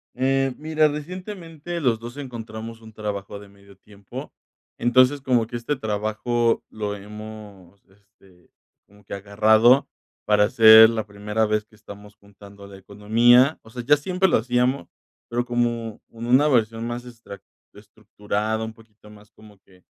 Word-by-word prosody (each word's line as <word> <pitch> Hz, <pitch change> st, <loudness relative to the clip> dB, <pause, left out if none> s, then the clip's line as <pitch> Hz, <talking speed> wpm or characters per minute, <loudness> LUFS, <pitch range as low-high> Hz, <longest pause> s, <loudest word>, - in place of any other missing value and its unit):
Eh, 135 Hz, 0 st, 0 dB
mira, 155 Hz, 0 st, +1 dB
recientemente 170 Hz, +1 st, -7 dB
los 115 Hz, -5 st, +1 dB
2 120 Hz, +3 st, -10 dB
encontramos 115 Hz, -4 st, -8 dB
un 110 Hz, -1 st, -14 dB
trabajo 100 Hz, -1 st, -6 dB
de 100 Hz, -1 st, -14 dB
medio 100 Hz, 0 st, -20 dB
tiempo, 100 Hz, -1 st, -11 dB, 0.5 s
entonces, 130 Hz, +3 st, +3 dB
como 125 Hz, -4 st, +1 dB
que 120 Hz, -, -8 dB
este 120 Hz, +5 st, -2 dB
trabajo 110 Hz, +1 st, -1 dB
lo 105 Hz, -1 st, -5 dB
hemos, 105 Hz, -2 st, -12 dB
este, 95 Hz, -2 st, -26 dB, 0.4 s
como 105 Hz, 0 st, -22 dB
que -, -, -9 dB
agarrado 110 Hz, +6 st, +3 dB, 0.4 s
para 105 Hz, 0 st, +3 dB
ser 110 Hz, 0 st, +8 dB
la 110 Hz, -2 st, -3 dB
primera 105 Hz, +2 st, -2 dB
vez 105 Hz, 0 st, 0 dB
que 110 Hz, -, -24 dB
estamos 105 Hz, 0 st, -13 dB
juntando 100 Hz, 0 st, -16 dB
la 100 Hz, -1 st, -12 dB
economía, 115 Hz, +8 st, +3 dB
o -, -, -16 dB
sea, 125 Hz, 0 st, -7 dB
ya 145 Hz, +4 st, +4 dB
siempre 185 Hz, +5 st, 0 dB
lo -, -, +3 dB
hacíamos, 125 Hz, -2 st, 0 dB, 0.4 s
pero 120 Hz, +1 st, -2 dB
como 120 Hz, -2 st, -2 dB
con 115 Hz, 0 st, -8 dB
una 130 Hz, +5 st, +4 dB
versión 115 Hz, -4 st, 0 dB
más 120 Hz, +1 st, -6 dB
estra 115 Hz, -4 st, -12 dB, 0.3 s
estructurada, 105 Hz, +1 st, -5 dB
un 110 Hz, -, -8 dB
poquito 110 Hz, -1 st, -20 dB
más 105 Hz, 0 st, -17 dB
como 105 Hz, -2 st, -18 dB
que, 90 Hz, -2 st, -25 dB
110 Hz, 155 wpm, -23 LUFS, 105-125 Hz, 0.5 s, ser